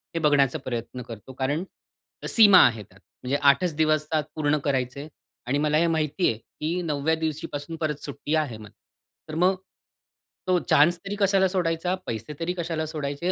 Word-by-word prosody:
हे - - +1
बघण्याचा 145 -1 +3
प्रयत्न 125 0 -5
करतो, 120 +1 -10
कारण 140 +6 -1 0.6
सीमा 205 -5 +7
आहे 115 -3 -4
त्यात, 95 -1 -22 0.2
म्हणजे 130 +2 -1
8 150 +4 +3
दिवसात 155 0 +1
पूर्ण 150 -1 +1
करायचंय 135 +1 -2 0.4
आणि 135 +3 +1
मला 150 +1 +2
हे 170 +2 +3
माहिती 160 +2 0
आहे 110 - -2
की 165 +9 -4
9वव्या 155 -1 0
दिवशीपासून 160 0 -4
परत 150 -2 -2
सुट्टी 145 +2 -3
आहे 145 -8 -1
मला. 105 -1 -13 0.6
तर 155 - -5
मग 180 +3 +3 0.9
तो 180 -1 +3
चान्सतरी 175 +7 +3
कशाला 195 -1 +3
सोडायचा, 180 -1 -1
पैसेतरी 150 +10 -4
कशाला 165 -2 -2
सोडायचे 150 +3 -3
155 Hz, 155 wpm, -25 LUFS, 140-165 Hz, 0.9 s, सीमा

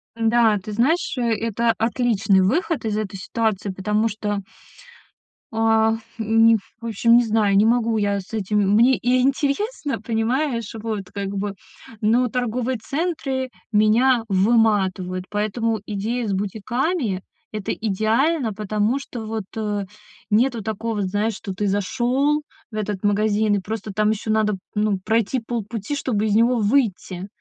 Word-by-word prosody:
Н-да, 225 -1 +3
ты 210 +2 -7
знаешь, 280 +11 +1
это 230 -1 +1
отличный 220 -4 +2
выход 310 - 0
из 215 -1 -1
этой 205 -2 -3
ситуации, 210 0 -1
потому 210 +4 0
что 205 -1 -3 1.1
а, 225 0 +3 0.2
м, 225 +1 +4 0.2
в - - -8
общем, 230 +2 +4
не 245 - +3
знаю, 210 -3 +2
не 205 - +5
могу 230 -1 +2
я 200 -1 0
с 190 - -17
этим. 210 -1 0 0.2
Мне 245 +4 +5
и 250 +1 +1
интересно, 285 - 0
понимаешь, 235 +1 -1
вот 215 -4 -4
как 200 -1 -3
бы, 200 0 -3 0.4
но 235 +4 +3
торговые 250 +1 -1
центры 275 -1 -2 0.2
меня 225 +3 +4
выматывают. 190 -3 +2
Поэтому 215 +1 -1
идея 220 +4 -2
с 200 - -1
бутиками- 220 - -1 0.3
это 215 -2 -3
идеально, 225 - +1
потому 215 +4 0
что 245 -5 -7
вот, 220 -1 -3
э, 210 -2 -2 0.4
нету 235 +2 +2
такого, 220 0 -2
знаешь, 205 +4 0
что 195 -1 -6
ты 205 +2 -1
зашёл 255 +9 +1 0.3
в - - -9
этот 210 -2 -3
магазин, 210 +1 +2
и - - +1
просто 215 +2 -5
там 215 +1 +2
ещё 220 0 -2
надо, 215 -1 +2 0.2
ну, 210 -2 +1
пройти 230 +3 +1
полпути, 225 +2 -4
чтобы 220 -6 0
из 210 - +1
него 235 +2 +4
выйти. 205 -5 0
220 Hz, 140 wpm, -22 LUFS, 205-240 Hz, 1.1 s, не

